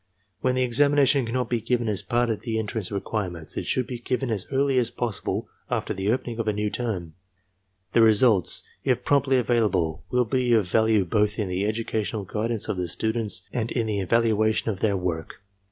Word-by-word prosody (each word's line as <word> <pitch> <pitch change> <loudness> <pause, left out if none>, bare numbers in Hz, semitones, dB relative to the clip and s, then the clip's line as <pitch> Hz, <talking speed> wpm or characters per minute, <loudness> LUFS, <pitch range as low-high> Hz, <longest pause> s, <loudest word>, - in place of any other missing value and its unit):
When 130 0 0
the 130 - +2
examination 140 +1 +3
cannot 125 +1 -1
be 120 -2 0
given 120 +1 0
as 105 -2 0
part 120 +4 0
of 110 - -2
the 115 -2 -3
en 110 - -1
trance 105 -3 -3
requirements, 95 -5 -2
it - - -4
should 130 - +1
be 125 -1 -6
given 125 +1 -2
as 100 -4 -2
early 135 -1 +2
as 120 -2 +1
possible 115 -6 -3 0.2
after - - -2
the 95 +2 -2
opening 120 -1 -2
of 115 - -2
a 105 - +2
new 105 0 -2
term. 95 -10 -3 0.8
The 115 - +4
results, 110 -4 +5 0.2
if - - 0
pi*omptly 140 -2 +3
avail 120 -2 +2
able, 85 -4 -2
will 125 0 +2
be 125 +1 +1
of 110 -5 +3
value 110 0 +2
both 105 +3 +1
in 105 -4 -2
the 95 +3 -1
educational 110 -1 -2
guidance 110 +3 -3
of - - -2
the 90 -1 -2
students 110 +2 -2
and 115 -2 -2
in 115 -3 0
the 105 -2 -1
evaluation 110 +2 +1
of 95 - -6
their 100 -2 +1
work. 85 -3 -4
110 Hz, 200 wpm, -25 LUFS, 100-120 Hz, 0.8 s, results